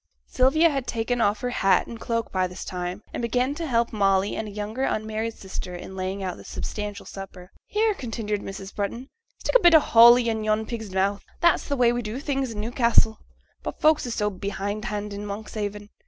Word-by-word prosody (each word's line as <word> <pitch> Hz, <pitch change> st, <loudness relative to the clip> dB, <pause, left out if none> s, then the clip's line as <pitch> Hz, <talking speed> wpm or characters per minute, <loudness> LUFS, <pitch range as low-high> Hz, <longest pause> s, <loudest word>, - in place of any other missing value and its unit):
Sylvia 310 Hz, +6 st, +4 dB
had 275 Hz, -3 st, -2 dB
taken 235 Hz, +1 st, -1 dB
off 205 Hz, 0 st, +2 dB
her 250 Hz, -1 st, -1 dB
hat 195 Hz, -5 st, +3 dB
and 230 Hz, -, -9 dB
cloak 230 Hz, -1 st, -2 dB
by 185 Hz, -1 st, +1 dB
this 180 Hz, +1 st, -8 dB
time, 180 Hz, +2 st, -4 dB
and -, -, -3 dB
began 250 Hz, +3 st, +1 dB
to 325 Hz, +2 st, -4 dB
help 235 Hz, -3 st, +1 dB
Molly 195 Hz, -1 st, +2 dB
and 220 Hz, -, -3 dB
a -, -, -7 dB
younger 210 Hz, +4 st, -4 dB
unmarried 220 Hz, -2 st, -1 dB
sister 185 Hz, -2 st, -7 dB
in 190 Hz, +2 st, -8 dB
laying 190 Hz, +1 st, -3 dB
out 185 Hz, -2 st, -3 dB
the -, -, -12 dB
substantial 210 Hz, -1 st, -5 dB
supper. 190 Hz, -2 st, -9 dB, 0.2 s
'Here,' 430 Hz, +1 st, +2 dB
continued 225 Hz, -, -3 dB
Mrs. 195 Hz, 0 st, -7 dB
Brunton; 235 Hz, +6 st, -3 dB, 0.3 s
'stick -, -, -2 dB
a -, -, +9 dB
bit 345 Hz, -2 st, +7 dB
o' -, -, +10 dB
holly 235 Hz, -2 st, +7 dB
i' 225 Hz, -, +2 dB
yon 215 Hz, 0 st, 0 dB
pig's 220 Hz, -2 st, -5 dB
mouth, 195 Hz, +2 st, 0 dB, 0.2 s
that's 340 Hz, -1 st, +3 dB
the 280 Hz, -, -1 dB
way 240 Hz, -1 st, +4 dB
we 240 Hz, -, -1 dB
do 225 Hz, +3 st, -5 dB
things 270 Hz, -5 st, -2 dB
i' -, -, -7 dB
Newcassel; 230 Hz, 0 st, +2 dB, 0.4 s
but -, -, -6 dB
folks 305 Hz, -4 st, +3 dB
is 235 Hz, -, -3 dB
so 210 Hz, -1 st, 0 dB
behindhand 205 Hz, +1 st, -4 dB
in 200 Hz, +1 st, -5 dB
Monkshaven. 205 Hz, 0 st, -5 dB
215 Hz, 205 wpm, -25 LUFS, 200-245 Hz, 0.4 s, o